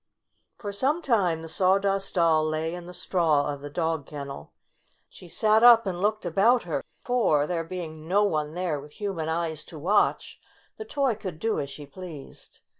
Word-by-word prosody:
For 205 Hz, -, -5 dB
some 275 Hz, +11 st, 0 dB
time 180 Hz, -10 st, +1 dB
the -, -, -7 dB
Sawdust 195 Hz, +3 st, +1 dB
Doll 165 Hz, -3 st, +4 dB
lay 155 Hz, +1 st, -2 dB
in 175 Hz, -1 st, -8 dB
the -, -, -8 dB
straw 160 Hz, -6 st, +1 dB
of 140 Hz, -, -9 dB
the 145 Hz, -, -7 dB
dog 160 Hz, -1 st, -2 dB
kennel. 140 Hz, -, -8 dB, 0.6 s
She 180 Hz, -, -14 dB
sat 215 Hz, +4 st, +3 dB
up 235 Hz, -2 st, +8 dB
and 180 Hz, -2 st, -3 dB
looked 215 Hz, 0 st, 0 dB
about 215 Hz, +8 st, +3 dB
her, 150 Hz, -5 st, -3 dB, 0.2 s
for, 225 Hz, -13 st, +2 dB
there 165 Hz, +1 st, -2 dB
being 160 Hz, -2 st, -7 dB
no 200 Hz, +4 st, +3 dB
one 155 Hz, -5 st, -1 dB
there 175 Hz, -5 st, -1 dB
with 145 Hz, +1 st, -12 dB
human 190 Hz, -6 st, -3 dB
eyes 160 Hz, -2 st, -2 dB
to 160 Hz, -, -11 dB
watch, 190 Hz, +8 st, +1 dB, 0.4 s
the 435 Hz, -, -7 dB
toy 275 Hz, -, 0 dB
could 190 Hz, -6 st, -7 dB
do 225 Hz, +7 st, -1 dB
as 140 Hz, -, -3 dB
she 145 Hz, +1 st, -9 dB
pleased. 160 Hz, -2 st, -11 dB
175 Hz, 185 wpm, -26 LUFS, 155-200 Hz, 0.6 s, up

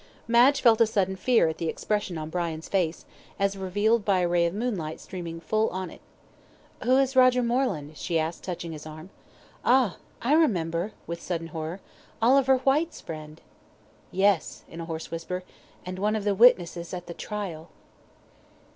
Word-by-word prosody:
Madge 245 Hz, +4 st, +5 dB
felt 230 Hz, -2 st, +5 dB
a 230 Hz, -, +6 dB
sudden 195 Hz, -4 st, 0 dB
fear 225 Hz, 0 st, +3 dB
at 160 Hz, 0 st, -3 dB
the 165 Hz, -, -1 dB
expression 205 Hz, -3 st, -2 dB
on 155 Hz, 0 st, -6 dB
Brian's 165 Hz, -2 st, -3 dB
face, 175 Hz, -4 st, -1 dB, 0.3 s
as 200 Hz, 0 st, +1 dB
revealed 205 Hz, +4 st, +1 dB
by 195 Hz, -2 st, +2 dB
a 175 Hz, -, +2 dB
ray 170 Hz, 0 st, +3 dB
of 170 Hz, -, -4 dB
moonlight 205 Hz, -9 st, -3 dB
streaming 170 Hz, -3 st, -7 dB
full 215 Hz, +7 st, +1 dB
on 185 Hz, -2 st, -5 dB
it. -, -, -14 dB, 0.8 s
"Who 255 Hz, +1 st, +4 dB
is 270 Hz, 0 st, +2 dB
Roger 255 Hz, -1 st, +5 dB
Moreland?" 235 Hz, -, -1 dB
she 170 Hz, -, -1 dB
asked, 160 Hz, +1 st, -2 dB
touching 175 Hz, -2 st, -5 dB
his 155 Hz, -1 st, -8 dB
arm 155 Hz, +4 st, -10 dB, 0.5 s
"Ah! 250 Hz, -6 st, +3 dB, 0.2 s
I 260 Hz, +5 st, +1 dB
remember," 185 Hz, -, +1 dB
with 170 Hz, 0 st, -5 dB
sudden 165 Hz, -2 st, -4 dB
horror, 160 Hz, +4 st, -5 dB, 0.4 s
"Oliver 265 Hz, +3 st, +5 dB
Whyte's 285 Hz, +6 st, +1 dB
friend." 155 Hz, -1 st, -9 dB, 0.7 s
"Yes," 190 Hz, -3 st, +1 dB
in 165 Hz, -, -8 dB
a -, -, -5 dB
hoarse 160 Hz, -1 st, -6 dB
whisper, 175 Hz, +2 st, -4 dB, 0.4 s
"and 185 Hz, +1 st, -5 dB
one 210 Hz, +2 st, +1 dB
of 215 Hz, -, -2 dB
the 205 Hz, 0 st, +2 dB
witnesses 180 Hz, -6 st, +4 dB
at 180 Hz, -1 st, -7 dB
the 170 Hz, -, -7 dB
trial." 180 Hz, -6 st, -6 dB
185 Hz, 170 wpm, -26 LUFS, 165-230 Hz, 0.8 s, a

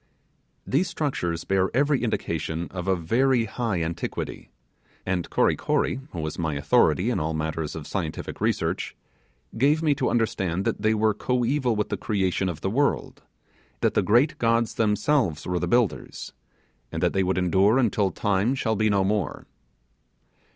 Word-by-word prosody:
These 160 Hz, +8 st, +1 dB
structures 90 Hz, -, -2 dB
bear 95 Hz, -1 st, +1 dB
every 140 Hz, +1 st, +2 dB
indication 85 Hz, -6 st, -2 dB
of 90 Hz, -1 st, -5 dB
a 95 Hz, -, +3 dB
very 115 Hz, +8 st, +2 dB
high 110 Hz, -6 st, -2 dB
antiquity 85 Hz, +1 st, -5 dB, 0.6 s
and 90 Hz, -2 st, -2 dB
Kory -, -, +2 dB
Kory, 130 Hz, -, 0 dB
who 85 Hz, -, -5 dB
was 80 Hz, +2 st, -4 dB
my 80 Hz, -3 st, -1 dB
authority 70 Hz, -, +3 dB
in -, -, 0 dB
all 80 Hz, +1 st, -2 dB
matters 80 Hz, 0 st, -3 dB
of 80 Hz, -3 st, -6 dB
scientific 80 Hz, -4 st, -4 dB
research, -, -, -1 dB, 0.6 s
gave 150 Hz, +5 st, +3 dB
me 150 Hz, -2 st, +4 dB
to -, -, 0 dB
understand 95 Hz, -6 st, 0 dB
that -, -, -1 dB
they 110 Hz, +1 st, +2 dB
were 110 Hz, 0 st, +2 dB
coeval 125 Hz, +2 st, 0 dB
with 105 Hz, -, -1 dB
the -, -, -2 dB
creation 95 Hz, -2 st, 0 dB
of 80 Hz, -3 st, -6 dB
the 95 Hz, -, -1 dB
world; 140 Hz, +5 st, 0 dB, 0.6 s
that -, -, +2 dB
the -, -, +3 dB
great 120 Hz, +8 st, +3 dB
gods 115 Hz, -1 st, +2 dB
themselves 110 Hz, -, +1 dB
were 90 Hz, -1 st, -1 dB
the -, -, -2 dB
builders; 120 Hz, -4 st, -1 dB, 0.6 s
and -, -, -3 dB
that -, -, +2 dB
they 95 Hz, -, +2 dB
would 95 Hz, 0 st, 0 dB
endure 95 Hz, +5 st, +3 dB
until 105 Hz, -6 st, +2 dB
time 100 Hz, +6 st, 0 dB
shall 115 Hz, -4 st, 0 dB
be 110 Hz, +1 st, +2 dB
no 100 Hz, -2 st, +2 dB
more. 100 Hz, -2 st, -1 dB
100 Hz, 165 wpm, -25 LUFS, 85-120 Hz, 0.6 s, me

